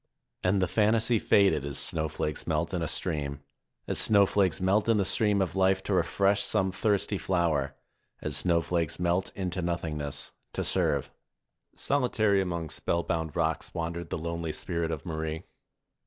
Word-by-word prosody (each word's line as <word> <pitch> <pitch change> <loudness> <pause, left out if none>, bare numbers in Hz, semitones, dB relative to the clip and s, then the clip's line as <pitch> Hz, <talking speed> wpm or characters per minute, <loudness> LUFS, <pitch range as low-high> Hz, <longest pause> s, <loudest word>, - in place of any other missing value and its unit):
And 95 +1 +2
the - - +1
fantasy 110 +2 +2
faded 100 -9 +3
as 70 -1 -3
snowflakes 75 -1 -1
melt 80 +2 -1
in 90 - -1
a 80 - -1
stream, 70 -6 -3 0.4
as - - +1
snowflakes 100 -3 +3
melt 100 +4 +2
in 115 - +4
the 100 - +1
stream 105 0 +2
of 90 -1 -5
life 95 0 +2
to - - -1
refresh 100 0 +2
some 95 -1 +1
thirsty 100 0 0
flower, 80 -7 0 0.4
as - - -4
snowflakes 85 -2 0
melt 90 +2 0
into 90 -1 -2
nothingness, 80 -4 -3 0.2
to - - -2
serve. - - +1 0.6
Solitary 110 -7 +2
among 85 -4 -3
spellbound 80 -2 -2
rocks 80 +2 -1
wandered 85 0 -4
the - - -2
lonely 85 0 -3
spirit 85 -2 -2
of 80 +1 -4
Marie. 80 0 -4
85 Hz, 150 wpm, -28 LUFS, 80-100 Hz, 0.6 s, in